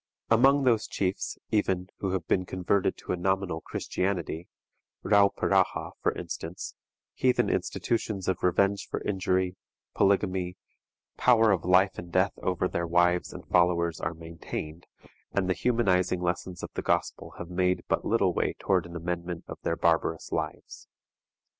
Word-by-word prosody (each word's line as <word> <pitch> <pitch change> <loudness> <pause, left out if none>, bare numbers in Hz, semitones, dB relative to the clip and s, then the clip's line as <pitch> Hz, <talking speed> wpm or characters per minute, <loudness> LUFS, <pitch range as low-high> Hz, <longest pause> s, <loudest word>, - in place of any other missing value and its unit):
Among 135 +5 +5
those 115 -4 +3
chiefs, 95 -1 -2
even, 95 -3 +1
who 95 - -1
have 90 -4 -2
been 90 - +2
converted 95 +2 0
to - - -6
a - - +1
nominal 90 -2 -1
Christianity, 90 -3 -3 0.6
Rauperaha 100 -1 +3
for - - +2
instance, 85 +2 -6 0.4
heathen 130 -1 +2
institutions 105 -5 -1
of 95 -2 0
revenge 100 +3 +2
for - - -3
injury, 95 -2 0 0.4
polygamy, 95 -2 +1 0.6
power 115 -3 +5
of 90 -5 0
life 95 +2 +4
and 85 0 -9
death 95 +3 +2
over 90 0 0
their 85 -1 -2
wives 90 +1 +2
and 90 -2 -9
followers 85 -1 +2
are 80 +2 -2
maintained, 80 0 -7 0.5
and 100 -2 +1
the 95 - +2
humanizing 95 -6 +1
lessons 90 0 -3
of - - -5
the - - -3
Gospel - - -1
have 85 - -7
made 90 0 +1
but - - 0
little - - +2
way - - 0
toward 90 -3 +1
an 85 - -11
amendment 85 0 -4
of - - -8
their 85 - 0
barbarous 80 -1 +1
lives. - - -4
90 Hz, 145 wpm, -28 LUFS, 85-100 Hz, 0.6 s, Among